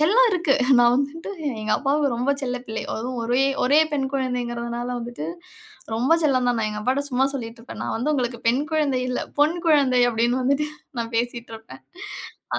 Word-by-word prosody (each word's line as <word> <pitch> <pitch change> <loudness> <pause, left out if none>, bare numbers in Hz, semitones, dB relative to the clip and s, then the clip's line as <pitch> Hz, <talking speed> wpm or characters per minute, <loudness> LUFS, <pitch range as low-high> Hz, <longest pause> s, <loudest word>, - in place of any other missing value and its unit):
செல்லம் 440 +11 +5
இருக்கு, 345 -7 +2 0.2
நான் 240 0 +6
வந்துட்டு 285 +7 -3 0.3
எங்க 215 0 -3
அப்பாவுக்கு 285 +1 +1
ரொம்ப 250 +4 0
செல்லப் 250 -1 -3
பிள்ளை. 220 0 -4
அதுவும் 245 +2 -4
ஒரே, 245 +3 +2 0.2
ஒரே 285 +4 +5
பெண் 270 -2 0
குழந்தைங்கிறதுனால 240 -2 -2
வந்துட்டு 235 -10 -6 0.7
ரொம்ப 255 +7 +2
செல்லம் 255 -4 +2
தான். 245 - +1
நான் 215 -1 0
எங்க 210 - -5
அப்பாட்ட 265 +4 0
சும்மா 260 +2 +2
சொல்லிட்டு 230 -3 -6
இருப்பேன், 240 - -10
நான் - - -2
வந்து 265 +7 0
உங்களுக்குப் 240 -3 -2
பெண் 255 +4 +2
குழந்தை 285 -5 +1
இல்ல, 250 - -1 0.2
பொன் 310 +4 +4
குழந்தை 275 -5 +4
அப்டின்னு 240 +3 +1
வந்துட்டு, 280 +3 +1 0.3
நான் 230 0 -3
பேசிட்டு 235 -1 -2
இருப்பேன். 225 0 -14 0.7
அ. - - 0
250 Hz, 180 wpm, -23 LUFS, 235-280 Hz, 0.7 s, நான்